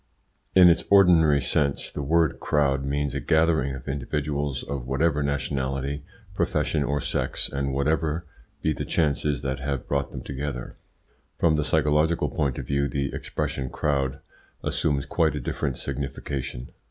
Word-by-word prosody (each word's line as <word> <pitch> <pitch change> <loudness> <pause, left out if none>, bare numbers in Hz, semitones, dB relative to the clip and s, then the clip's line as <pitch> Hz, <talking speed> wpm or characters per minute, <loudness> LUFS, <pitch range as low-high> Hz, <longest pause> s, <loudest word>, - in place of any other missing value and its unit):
In 90 -1 +9
its 85 0 +4
ordinary 85 -7 +6
sense 70 +2 0
the - - -4
word 80 +2 +2
"crowd" 70 -2 +1
means 70 0 -1
a - - -1
gathering 80 -4 +2
of 65 - -10
individuals 70 0 -2
of 70 -4 -5
whatever 75 +3 +1
nationality, 70 0 -2 0.3
profession, 75 -2 0
or 70 +1 0
sex, - - -1
and 70 -1 -2
whatever 75 +4 0 0.4
be 80 - +2
the - - -4
chances 75 -2 0
that 65 0 -2
have 70 -1 -3
brought 70 -1 0
them - - -7
together. 70 -2 -5 0.6
From 80 -2 +3
the 75 - +1
psychological 75 +2 +2
point 70 -4 -1
of - - -4
view 70 0 +1
the 70 +1 -2
expression 65 -2 -3
"crowd" 70 -2 0 0.5
assumes 70 -2 0
quite 80 +1 +1
a - - -2
different 65 +1 -2
signification. 65 -2 -4
70 Hz, 150 wpm, -25 LUFS, 70-75 Hz, 0.6 s, In